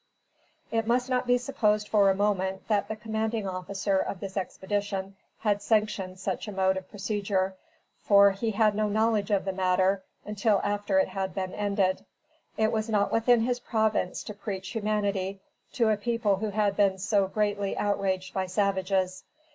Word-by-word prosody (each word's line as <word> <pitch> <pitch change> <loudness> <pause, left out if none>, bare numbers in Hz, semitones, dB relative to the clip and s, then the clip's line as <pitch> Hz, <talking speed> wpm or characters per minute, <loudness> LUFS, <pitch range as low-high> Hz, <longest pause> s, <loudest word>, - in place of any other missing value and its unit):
It 225 -1 0
must 250 +2 +1
not 250 0 +1
be 245 0 +4
supposed 215 -5 0
for 205 -2 +4
a 190 - +3
moment 190 -2 -1
that 205 -2 +2
the 220 - -4
commanding 220 -1 -2
officer 190 +1 -1
of 190 - -3
this 195 0 -7
expedition 195 0 -3 0.3
had 205 -2 +1
sanctioned 205 -3 0
such 190 +2 -3
a - - -4
mode 190 -1 +2
of 190 0 -6
procedure, 200 -2 -1 0.5
for, 200 -1 +6
he 195 +4 -2
had 215 0 +3
no 210 0 0
knowledge 215 -1 +1
of 200 -2 +1
the 190 - -1
matter 185 +1 +2 0.2
until 210 0 +1
after 205 -1 0
it 190 - +3
had 190 -1 -3
been 185 -1 -3
ended. 200 -2 0 0.5
It 220 0 +2
was 220 0 -1
not 205 -2 +1
within 225 +1 +4
his 245 +1 0
province 220 -6 0
to 210 - -7
preach 195 -2 -5
humanity 205 -3 -1 0.3
to 230 -3 +2
a 215 - +2
people 225 -2 0
who 215 +2 -2
had 205 -1 +1
been 195 -2 +3
so 200 +1 +1
greatly 205 -1 -1
outraged 190 -2 -1
by 190 -1 -1
savages. 190 -1 0
205 Hz, 170 wpm, -28 LUFS, 190-215 Hz, 0.5 s, for